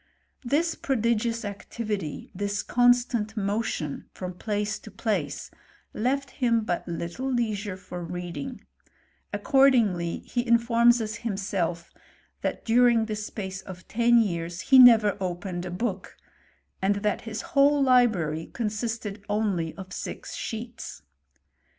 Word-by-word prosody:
This 315 Hz, +7 st, +1 dB
prodi 235 Hz, -4 st, +1 dB
gious 230 Hz, 0 st, -2 dB
activity, 205 Hz, -4 st, -5 dB
this 205 Hz, +1 st, -2 dB
constant 245 Hz, -2 st, +2 dB
motion 200 Hz, -7 st, -2 dB
from 185 Hz, -1 st, -5 dB
place 210 Hz, +2 st, -2 dB
to -, -, -12 dB
place, -, -, -2 dB, 0.4 s
leit 275 Hz, +4 st, -1 dB
him 235 Hz, -3 st, +1 dB
but 175 Hz, -3 st, -2 dB
little 175 Hz, +10 st, -3 dB
leisure 215 Hz, -5 st, -1 dB
for 180 Hz, -2 st, -7 dB
reading: 180 Hz, +10 st, -6 dB, 0.7 s
accordingly 230 Hz, -, +3 dB
he 240 Hz, -, -1 dB
i^forqcis 235 Hz, 0 st, +4 dB
us 215 Hz, -1 st, -3 dB
himself, 190 Hz, -6 st, -2 dB, 0.5 s
that -, -, -3 dB
during 235 Hz, -1 st, +4 dB
the 215 Hz, -1 st, -3 dB
space 195 Hz, -2 st, -5 dB
of 185 Hz, -1 st, -11 dB
ten 235 Hz, +1 st, +4 dB
years 175 Hz, -5 st, 0 dB
he 265 Hz, -1 st, +6 dB
never 225 Hz, -5 st, +8 dB
opened 180 Hz, -1 st, -3 dB
a -, -, -5 dB
book, 190 Hz, +1 st, -4 dB, 0.6 s
and 195 Hz, +2 st, +2 dB
that 210 Hz, -, +1 dB
his 225 Hz, -1 st, -5 dB
whole 280 Hz, 0 st, +5 dB
library 210 Hz, -, +3 dB
consisted 220 Hz, -2 st, -3 dB
only 200 Hz, -6 st, 0 dB
of 190 Hz, -1 st, -9 dB
six -, -, -6 dB
sheets. 230 Hz, -, -6 dB
215 Hz, 125 wpm, -26 LUFS, 185-240 Hz, 0.7 s, never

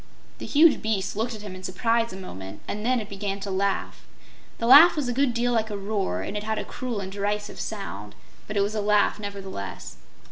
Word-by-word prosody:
The -, -, -6 dB
huge 310 Hz, +2 st, +5 dB
beast 210 Hz, -3 st, -1 dB
looked 225 Hz, +2 st, -2 dB
at 210 Hz, -, -10 dB
him 200 Hz, -3 st, -7 dB
in 185 Hz, -, -9 dB
surprise 230 Hz, +5 st, 0 dB
a 190 Hz, -, -7 dB
moment, 95 Hz, -, -8 dB
and 210 Hz, -, -4 dB
then 250 Hz, +2 st, +2 dB
it 215 Hz, -, -6 dB
began 200 Hz, 0 st, -4 dB
to 200 Hz, 0 st, -4 dB
laugh. 195 Hz, +1 st, -2 dB, 0.5 s
The 230 Hz, -, -2 dB
laugh 290 Hz, +8 st, +9 dB
was 295 Hz, -5 st, -1 dB
a 245 Hz, -, 0 dB
good 270 Hz, +1 st, +2 dB
deal 240 Hz, +1 st, 0 dB
like 220 Hz, -1 st, +1 dB
a 205 Hz, -, -4 dB
roar, 195 Hz, -, -2 dB
and 205 Hz, -, -5 dB
it 210 Hz, -, -2 dB
had 220 Hz, +1 st, -2 dB
a -, -, -3 dB
cruel 245 Hz, -4 st, -4 dB
and 190 Hz, 0 st, -6 dB
derisive 205 Hz, +1 st, -3 dB
sound, 105 Hz, -, -6 dB, 0.3 s
but 210 Hz, -, -4 dB
it -, -, +4 dB
was 200 Hz, +2 st, 0 dB
a 215 Hz, -, -1 dB
laugh 210 Hz, 0 st, +3 dB
nevertheless. 200 Hz, -, -7 dB
210 Hz, 225 wpm, -25 LUFS, 195-230 Hz, 0.5 s, laugh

